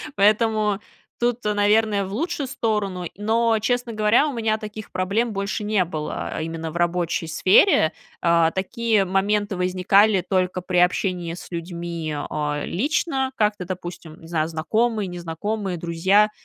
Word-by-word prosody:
Поэтому 210 0 +3 0.4
тут, 240 0 0
наверное, 210 0 +2
в 190 - -7
лучшую 310 - -2
сторону. 210 -8 -2
Но, 225 +2 +2
честно 245 +1 -1
говоря, 215 +7 +3
у 290 - -3
меня 220 -2 0
таких 215 -1 -8
проблем 210 +5 0
больше 200 +1 -3
не 210 -2 +2
было 155 -3 -4
именно 165 0 -4
в 170 - -5
рабочей 175 -1 0
сфере. 170 - +4 0.3
А, 170 -1 +3
такие 210 +2 0
моменты 200 +2 0
возникали 185 +3 +3
только 185 -1 0
при 180 0 -2
общении 180 -1 +1
с 175 - -9
людьми, 170 -2 -4
а, 150 0 -2
лично, 265 - 0
как-то, 210 -4 0
допустим, 175 -3 -7
не 165 - -12
знаю, 160 -2 0
знакомые, 210 +7 0
незнакомые, 180 +3 -4
друзья, 180 +6 +3
195 Hz, 140 wpm, -23 LUFS, 175-215 Hz, 0.4 s, сфере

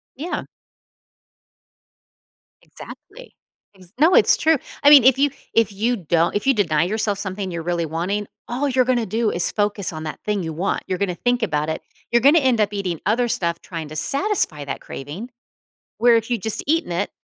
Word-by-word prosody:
Yeah. 330 +6 -4 2.2
Exactly. - - -13 0.4
Is 185 +2 -18
No, 325 +4 +5
it's - - +5
true. 320 -1 +3 0.3
I 285 - +7
mean, 285 -5 +9
if 265 +1 +5
you 285 0 +3 0.2
if 225 -2 +2
you 225 +5 0
don't 170 -1 0
if 205 - -2
you 270 - +5
deny 165 -8 +1
yourself 205 +1 -1
something 190 -1 -4
you're 170 - -4
really 170 0 -2
wanting, 185 +6 -3 0.2
all 260 +4 -2
you're 255 -1 +2
gonna 245 -3 +1
do 220 +2 0
is 175 - +1
focus 205 -4 -1
on 155 0 -6
that 155 - -6
thing 210 -2 -1
you 160 -2 -5
want. 185 +5 -2
You're 185 - -2
gonna 180 -2 -2
think 245 +2 0
about 155 -5 -1
it, 160 - -3 0.3
you're 235 -1 +3
gonna 290 +5 +6
end 260 -5 +1
up 210 0 0
eating 185 -5 -3
other 240 +4 +1
stuff 170 -6 -1
trying 165 -4 -7
to 155 - -9
satisfy 275 - 0
that 140 - -5
craving, 155 - -8 0.7
where 235 -1 +5
if 225 +2 -2
you'd 230 -5 -1
just 220 - 0
eaten 325 - 0
it 175 +4 -2
205 Hz, 190 wpm, -21 LUFS, 170-245 Hz, 2.2 s, mean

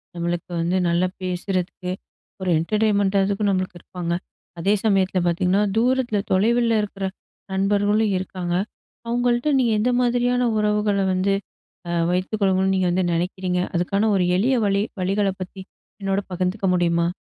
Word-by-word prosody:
நம்பளுக்கு 170 +1 -3
வந்து 175 +3 +1
நல்லா 175 +2 +2
பேசுறதுக்கு 180 0 -3 0.5
ஒரு 185 - -1
என்டர்டெய்ன்மெண்டா 200 +1 +1
அதுக்கும் 200 +1 0
நம்பளுக்கு 185 -2 -2
இருப்பாங்க. 175 -2 -4 0.5
அதே 195 +5 +2
சமயத்துல 190 -2 +2
பாத்தீங்கன்னா, 180 +3 +2 0.2
தூரத்துல, 245 -2 +2
தொலைவுல 230 +4 +3
இருக்குற 200 -2 -4 0.5
நண்பர்களும் 205 +2 +2
இருக்காங்க. 180 -2 -3 0.5
அவங்கள்ட்ட 240 +3 +1
நீங்க 240 -3 +2
எந்த 230 +4 +2
மாதிரியான 245 0 +2
உறவுகள 210 -1 +1
வந்து 190 +2 +1 0.6
அ - - -3 0.2
வைத்துக்கொள்ளுனும்ன்னு, 190 0 +1
நீங்க 185 -1 +1
வந்து 185 +2 +1
நினைக்கிறீங்க? 180 +1 -1
அதுக்கான 200 +5 +1
ஒரு 185 -2 +2
எளிய 240 +8 +2
வழி 200 -1 +2 0.2
வழிகளப் 195 +1 0
பத்தி 185 +1 -7 0.4
என்னோட 195 0 0
பகிர்ந்துக்க 185 +3 -1
முடியுமா? 170 -1 +2
195 Hz, 130 wpm, -22 LUFS, 180-210 Hz, 0.6 s, தொலைவுல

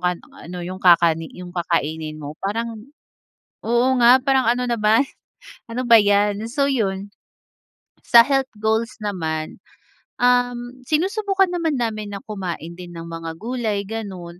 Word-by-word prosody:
yung 180 -1 -3
ano 180 +4 -9
yung 185 +1 -6
kakani 165 -2 +4
yung 180 0 -9
kakainin 160 -3 -2
mo. 145 -1 -7
Parang, 225 +2 -3 0.9
oo 240 +2 +3
nga 245 +2 +7
parang 270 -2 +2
ano 250 +1 0
naman 220 0 +3 0.7
ano 245 +2 -2
ba 230 -1 +9
'yan? 205 +1 +2
So 280 +3 +1
'yon, 200 -5 -2 1.0
sa 235 - +9
health 270 -1 +1
goals 220 +3 0
naman, 160 -6 -3 0.6
uhm, 245 0 +1
sinusubukan 385 +4 +1
naman 325 -6 -1
namin 215 -3 -3
na - - -5
kumain 180 -5 -5
din 175 0 -10
ng 165 0 -7
mga 165 -1 -6
gulay 225 -3 -2
gano'n. 185 -6 -7
210 Hz, 140 wpm, -21 LUFS, 175-245 Hz, 1.0 s, ba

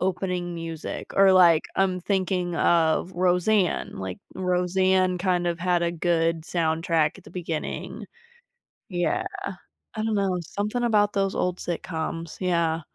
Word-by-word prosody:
opening 180 -1 -2
music. 165 -1 -6
Or, 195 -1 +6
like, 170 -4 +6
I'm 185 -1 +1
thinking 185 -2 -1
of 170 +2 +2
Roseanne. 180 +2 +1
Like, 95 -1 -5 0.2
Roseanne 185 0 +1
kind 180 -1 +1
of 170 -1 -1
had 175 0 +1
a 170 0 0
good 165 -1 +1
soundtrack 165 0 0
at 185 - -16
the - - -13
beginning. 165 -3 -5 0.8
Yeah. 175 -2 0 0.7
I 215 - -2
don't 220 -1 0
know, 195 -3 0
something 210 +8 -3
about 210 -3 +3
those 195 -1 0
old 180 0 -1
sitcoms, 165 -1 -4
yeah. 170 -3 +1
180 Hz, 135 wpm, -25 LUFS, 165-190 Hz, 0.8 s, Or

